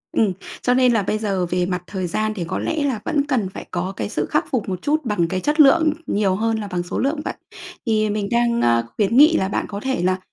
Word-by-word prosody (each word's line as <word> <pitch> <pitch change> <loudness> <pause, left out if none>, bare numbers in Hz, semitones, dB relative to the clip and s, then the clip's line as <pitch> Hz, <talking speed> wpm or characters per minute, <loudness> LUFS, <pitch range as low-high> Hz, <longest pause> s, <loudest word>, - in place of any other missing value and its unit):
Ừm, 210 -4 +2 0.3
cho 250 - +2
nên 250 -1 +4
là 220 -3 +2
bây 215 - -1
giờ 195 -4 -1
về 180 +1 0
mặt 180 0 -3
thời 185 -2 -3
gian 215 +5 -1
thì 190 -5 -4
có - - -2
lẽ 315 -2 -1
là 260 -7 -1
vẫn 300 -4 +1
cần 235 -9 0
phải - - -9
có 185 +2 -2
cái - - -3
sự - - -1
khắc - - +1
phục 230 -7 -1
một 185 -1 -4
chút 305 0 0
bằng 205 -7 +1
cái 185 +2 -2
chất 295 - -1
lượng 310 +2 +6
nhiều 200 -2 +1
hơn 225 +2 0
là 210 - -5
bằng 180 -2 -2
số 175 - -5
lượng 285 +4 0
vậy. - - -2 0.5
Thì 215 -2 +1
mình 205 -1 -1
đang, 235 0 +2
a, 115 0 +3
khuyến 210 +2 +2
nghị 310 +4 +7
là 190 - 0
bạn 195 - -2
có 200 - -5
thể 265 +1 -2
là 185 +1 +1
215 Hz, 265 wpm, -21 LUFS, 185-255 Hz, 0.5 s, nghị